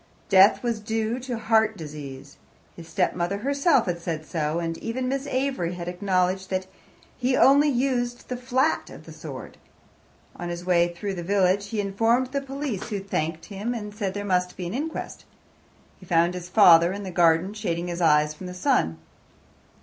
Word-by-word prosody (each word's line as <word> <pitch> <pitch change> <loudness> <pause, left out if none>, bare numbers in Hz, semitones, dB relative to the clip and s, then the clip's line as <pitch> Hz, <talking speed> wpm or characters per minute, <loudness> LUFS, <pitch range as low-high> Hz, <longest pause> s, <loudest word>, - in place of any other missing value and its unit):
Death 195 +3 +6
was 235 -3 -1
due 220 +2 -2
to 250 -2 -4
heart 220 -1 +2
disease. 145 -3 -9 0.4
His 165 -1 -11
stepmother 180 0 0
herself 280 - +2
had 170 -1 -3
said 160 -2 -4
so, 155 0 -2
and 165 -1 -2
even 255 +3 -3
Miss 275 +2 -2
Avery 260 -10 -1
had 175 -1 -6
acknowledged 185 0 0
that 185 0 -1 0.5
he 255 +1 +1
only 285 +2 +6
used 245 -2 -1
the 250 - -3
flat 260 +4 0
of - - -12
the - - -11
sword. - - -9 0.8
On 175 - -5
his 175 0 -5
way 175 -1 +3
through 195 +3 -4
the 180 - -5
village 195 +1 +2
he 220 0 -3
informed 225 +6 +1
the 280 0 -1
police, 275 -6 -4
who 205 -3 -2
thanked 165 -4 -3
him, 210 +5 -4
and 210 -2 -6
said 200 -2 -3
there 205 0 -4
must 180 -2 0
be 180 - -4
an 175 - -4
inquest. 305 +6 -5 0.8
He 185 - -15
found 170 +1 +3
his 180 -1 -7
father 175 -4 +7
in 200 +1 -5
the 190 - -5
garden 170 +2 +3
shading 175 -5 -3
his 175 0 -4
eyes 150 -2 +4
from 180 +4 -9
the 180 - -7
sun. 80 - +1
195 Hz, 180 wpm, -25 LUFS, 175-240 Hz, 0.8 s, father